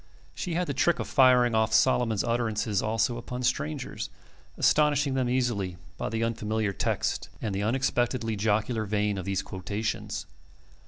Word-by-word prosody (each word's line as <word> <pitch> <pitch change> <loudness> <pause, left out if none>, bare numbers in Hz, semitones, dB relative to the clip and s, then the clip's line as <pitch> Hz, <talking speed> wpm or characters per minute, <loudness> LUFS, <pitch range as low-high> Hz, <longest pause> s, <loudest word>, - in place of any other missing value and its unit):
She 175 -3 -3
had 180 +1 +1
the 140 - -2
trick 145 +6 +2
of - - -4
firing 125 -3 +5
off 110 0 +2
Solomon's 115 -3 +3
utterances 110 -3 0
also 115 +2 0
upon 125 +1 -5
strangers, 75 -9 -2 0.5
astonishing 150 -2 +3
them 130 -2 0
easily 115 -8 0 0.2
by - - -2
the 115 +1 -1
unfamiliar 110 -2 -1
text - - -1
and 105 -3 -3
the 100 - -1
unexpectedly 120 0 0
jocular 110 +2 0
vein 105 -1 0
of 90 - -6
these 100 -1 -1
quotations. 100 +4 -4
115 Hz, 150 wpm, -28 LUFS, 105-125 Hz, 0.5 s, firing